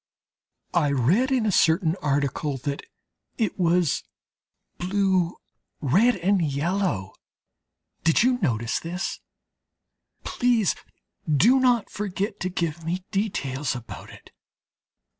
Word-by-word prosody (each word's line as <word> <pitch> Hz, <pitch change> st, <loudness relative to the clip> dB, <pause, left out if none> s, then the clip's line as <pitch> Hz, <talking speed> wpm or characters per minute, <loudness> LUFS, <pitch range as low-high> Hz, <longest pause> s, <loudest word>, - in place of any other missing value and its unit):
I 155 Hz, -4 st, +3 dB
read 160 Hz, -, +2 dB
in 250 Hz, -4 st, +2 dB
a 210 Hz, -, +2 dB
certain 165 Hz, -1 st, +3 dB
article 145 Hz, 0 st, -1 dB
that 140 Hz, +2 st, -4 dB, 0.6 s
it 215 Hz, -5 st, -1 dB
was 175 Hz, -2 st, +2 dB, 0.8 s
blue, 185 Hz, -1 st, +1 dB, 0.4 s
red, 195 Hz, -, +3 dB
and 190 Hz, +1 st, +1 dB
yellow. 150 Hz, -, -1 dB, 0.9 s
Did 165 Hz, +6 st, +4 dB
you 250 Hz, 0 st, +2 dB
notice 115 Hz, -, 0 dB
this? 175 Hz, +3 st, -4 dB, 1.0 s
Please 240 Hz, -6 st, +2 dB, 0.6 s
do 225 Hz, -, +5 dB
not 245 Hz, -4 st, +2 dB
forget 200 Hz, 0 st, -3 dB
to 185 Hz, -, -2 dB
give 170 Hz, -2 st, -3 dB
me 175 Hz, +3 st, -3 dB
details 150 Hz, -10 st, -1 dB
about 120 Hz, -2 st, -9 dB
it.... -, -, -15 dB
175 Hz, 105 wpm, -25 LUFS, 145-200 Hz, 1.0 s, do